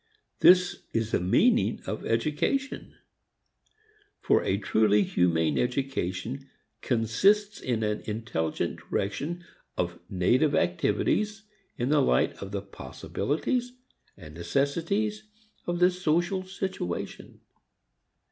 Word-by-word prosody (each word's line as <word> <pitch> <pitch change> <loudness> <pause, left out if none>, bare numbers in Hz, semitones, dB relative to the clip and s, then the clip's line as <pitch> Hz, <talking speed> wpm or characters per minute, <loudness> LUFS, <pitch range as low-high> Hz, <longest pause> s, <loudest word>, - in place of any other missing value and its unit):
This 180 0 +5
is 115 -1 -1
the - - +2
meaning 90 +2 +3
of - - -4
education; 155 - -1 1.2
for - - +2
a 95 - +1
truly 105 0 +3
humane 80 -5 +1
education 130 -1 -2 0.3
consists 195 - +2
in 115 -3 -1
an 105 0 -1
intelligent 105 -8 -2
direction 150 - -3 0.3
of 85 -1 -2
native 125 - +2
activities 200 +5 0 0.3
in 120 +2 -1
the 150 -1 +4
light 65 - +2
of 100 - -6
the 100 -1 -3
possibilities 160 - -3 0.4
and 75 -5 -12
necessities 165 - -1 0.5
of 175 0 -1
the 180 +1 +5
social 180 +1 0
situation. 190 - -5
130 Hz, 100 wpm, -27 LUFS, -, 1.2 s, This